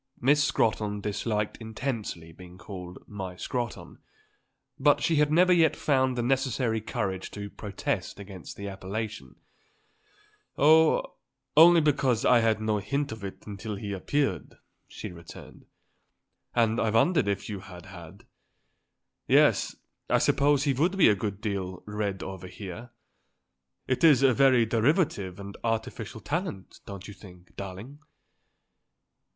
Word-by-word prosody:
Miss 145 +4 +4
Scrotton 105 -5 0
disliked 105 +1 -2
intensely 110 -7 -5
being 90 +2 -13
called 90 -2 -10
"my 95 -3 -6
Scrotton;" 120 +4 -5 0.8
but 145 +1 +4
she 165 - +2
had 150 0 +3
never 180 +3 +5
yet 165 -3 +4
found 130 -3 +1
the 120 - 0
necessary 125 -3 0
courage 95 -3 -3
to 100 -1 -7
protest 100 0 -4
against 95 -3 -10
the 100 - -6
appellation. 95 - -6 1.2
"Oh, 160 +2 +4 0.4
only 165 +2 +8
because 135 -6 +1
I 125 - +6
had 115 -1 +2
had - - -11
no 110 -1 0
hint 140 +8 -2
of 110 -2 -8
it 95 - -8
until 105 +1 -6
he 100 0 -5
appeared," 100 - -1 0.3
she - - -8
returned. 85 -1 -13 0.9
"And 115 -1 +2
I 110 - +1
wondered 115 - +3
if 100 -1 -2
you 105 -3 -5
had 90 -2 -12
had. 90 0 -12 1.0
Yes; - - +4 0.3
I - - +4
suppose 145 0 +3
he 140 -2 +2
would 170 +9 +1
be 185 - +6
a 105 - +4
good 100 0 -4
deal 95 -4 -4
read 105 -2 -3
over 95 -1 -7
here. 100 +5 -8 1.0
It 130 +3 -1
is 145 -5 +6
a 130 -2 +5
very 130 -3 +4
derivative 115 - +1
and 100 0 -8
artificial 115 -1 -3
talent, 155 - -4
don't 100 -1 -8
you 105 - -9
think, 90 -3 -16
darling?" 100 +9 -8
110 Hz, 140 wpm, -27 LUFS, 100-135 Hz, 1.2 s, only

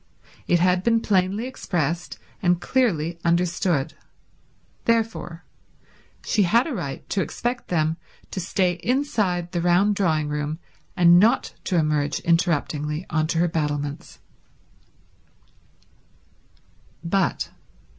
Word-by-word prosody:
It 175 - +3
had 180 +1 +3
been 230 +1 +3
plainly 195 +2 +1
expressed 175 - -3 0.2
and 175 -1 +2
clearly 175 -6 0
understood. 170 -3 +1 0.9
Therefore 225 -7 -1 0.8
she 215 - +2
had 230 +7 +3
a 315 - -3
right 160 - -5
to 195 - 0
expect 245 +4 -3
them 160 -2 0 0.3
to - - -4
stay 180 0 0
inside 210 -9 0
the 175 -2 -1
round 180 +4 +3
drawing 160 -6 +1
room 150 +1 -3 0.4
and 175 0 +7
not 230 +6 +3
to 180 - 0
emerge 150 -2 +1
interruptingly 160 -2 0
on 155 0 +1
to 165 - -1
her 175 +1 +3
battlements. 145 -3 -3
175 Hz, 105 wpm, -23 LUFS, 160-200 Hz, 0.9 s, and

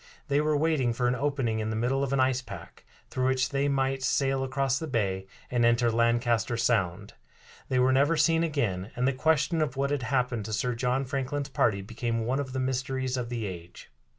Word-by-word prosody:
They 145 +1 +3
were 150 0 +1
waiting 145 -6 +1
for 125 +1 0
an 125 - +2
opening 135 -5 -1
in 110 0 -2
the 110 - -2
middle 125 +5 0
of 135 - -2
an 140 - +1
ice 130 0 +2
pack, 95 -9 -11 0.3
through 130 0 0
which 130 0 +1
they 140 0 0
might 135 -1 0
sail 135 0 +1
across 135 0 0
the 160 - -4
bay 95 -7 -1 0.2
and 120 -1 +2
enter 115 0 +3
Lancaster 115 0 +1
Sound. 100 -5 0 0.6
They 130 - +1
were 130 +1 +4
never 145 +5 +3
seen 165 +1 +3
again, 110 - -1
and 125 +1 +1
the 135 - +2
question 160 +4 +1
of 140 -4 -1
what 140 +1 0
had 145 -2 0
happened 125 -4 -1
to 110 - -5
Sir 125 +4 0
John 125 +3 0
Franklin's 140 +1 -3
party 100 -7 +1
became 115 +2 -3
one 130 +4 0
of 135 -2 -4
the 130 - -3
mysteries 130 0 -1
of 125 -2 -3
the 120 -3 -3
age. 85 -7 -9
130 Hz, 210 wpm, -28 LUFS, 115-135 Hz, 0.6 s, were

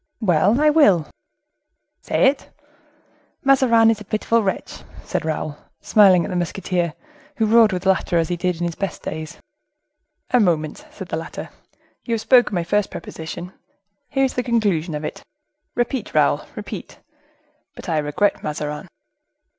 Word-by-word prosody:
"Well, 195 - +3
I 300 0 +5
will." 200 - +4 0.9
"Say - - +1
it!" 275 - 0 0.9
"Mazarin 250 -4 +5
was 220 -2 0
a - - -6
pitiful 215 +3 +1
wretch," 195 -3 -3 0.2
said - - -3
Raoul, 155 -1 -3 0.2
smiling 190 -5 +5
at - - -5
the - - -3
musketeer, 175 -1 -2 0.4
who 225 - +1
roared 225 0 +5
with 185 0 -3
laughter, 190 -2 +2
as 165 0 0
in 175 - -2
his 175 -1 -1
best 195 +2 -5
days. 160 +1 -6 0.9
"A 250 - +4
moment," 160 -7 0
said 190 -3 -10
the - - -2
latter; 165 - -7 0.5
"you 230 - -1
have 220 - -3
spoken 245 -5 +4
my 175 - 0
first 205 +4 0
proposition, 175 +3 -8 0.6
here 270 -1 +2
is 260 - -2
the 250 - -1
conclusion 200 -10 0
of 150 +1 -4
it,—repeat, 300 - -6
Raoul, - - +2
repeat: - - -8 0.8
'But - - -10
I 160 -3 +1
regret 150 +8 0
Mazarin. 150 0 -4
190 Hz, 145 wpm, -21 LUFS, 165-230 Hz, 0.9 s, I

